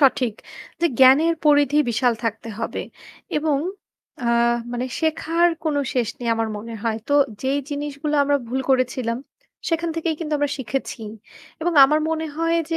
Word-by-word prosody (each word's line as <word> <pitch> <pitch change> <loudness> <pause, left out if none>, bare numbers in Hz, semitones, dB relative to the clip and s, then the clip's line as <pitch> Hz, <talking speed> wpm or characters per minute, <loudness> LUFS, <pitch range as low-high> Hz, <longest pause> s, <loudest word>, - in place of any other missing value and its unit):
সঠিক 255 -5 +3 0.5
যে 340 - +4
জ্ঞানের 275 +6 +6
পরিধি 290 -1 +4
বিশাল 240 +2 +2
থাকতে 225 0 -3
হবে - - -3 0.6
এবং 300 -2 +1 0.6
আ - - -3 0.5
মানে 245 +1 -2 0.2
শেখার 330 +2 +2 0.2
কোন 310 - 0 0.2
শেষ 245 -4 +1
নেই 240 - -4
আমার 225 0 0
মনে 230 +2 -7
হয়। 225 -2 0
তো 285 - 0 0.3
যেই 270 +2 +1
জিনিসগুলো 290 +1 -3
আমরা 285 0 +2
ভুল 260 +3 -1
করেছিলাম 255 -2 +1 0.5
সেখান 335 0 0
থেকেই 330 0 0
কিন্তু 310 -2 -4
আমরা 290 -1 0
শিখেছি 265 -1 -4 0.6
এবং 345 +2 0
আমার 300 +3 +3
মনে 320 0 -1
হয় 330 +1 +1 0.2
যে 330 - +1
285 Hz, 155 wpm, -22 LUFS, 250-315 Hz, 0.6 s, জ্ঞানের